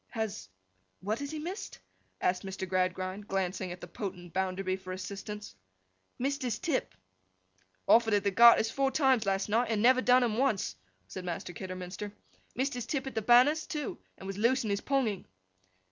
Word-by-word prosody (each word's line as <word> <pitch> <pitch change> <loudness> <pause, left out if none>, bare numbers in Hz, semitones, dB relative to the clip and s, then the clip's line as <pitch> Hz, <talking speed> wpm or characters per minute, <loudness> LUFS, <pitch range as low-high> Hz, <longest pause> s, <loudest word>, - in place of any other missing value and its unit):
'Has—what 95 - -6
has 285 0 -4
he 310 - -5
missed?' 355 +7 -6 0.4
asked 180 0 +1
Mr. 190 -1 -5
Gradgrind, 185 +2 -1
glancing 185 -1 -2
at 175 - -8
the 175 - -7
potent 180 -3 -6
Bounderby 185 0 -1
for 185 -1 -9
assistance. 205 +2 -7 0.6
'Missed 275 +3 -1
his 250 -3 -1
tip.' 330 -7 -2 0.9
'Offered 225 -2 +5
at 205 - +1
the 200 - +1
Garters 230 +1 +7
four 275 +2 +1
times 265 -5 +2
last 195 0 +1
night, 230 +4 +1
and 220 -2 +1
never 255 +3 +5
done 250 0 +5
'em 225 -3 0
once,' 220 - +1 0.3
said 185 - -7
Master 175 0 -5
Kidderminster. 185 +2 -6 0.4
'Missed 270 +3 0
his 245 -2 -5
tip 275 -3 -2
at 270 - -5
the 220 - -1
banners, 255 +8 +5
too, 300 -4 -4 0.2
and - - -11
was 195 +1 -5
loose 250 +4 +3
in 215 - -2
his 200 - 0
ponging. 250 -9 0
210 Hz, 175 wpm, -30 LUFS, 185-250 Hz, 0.9 s, Garters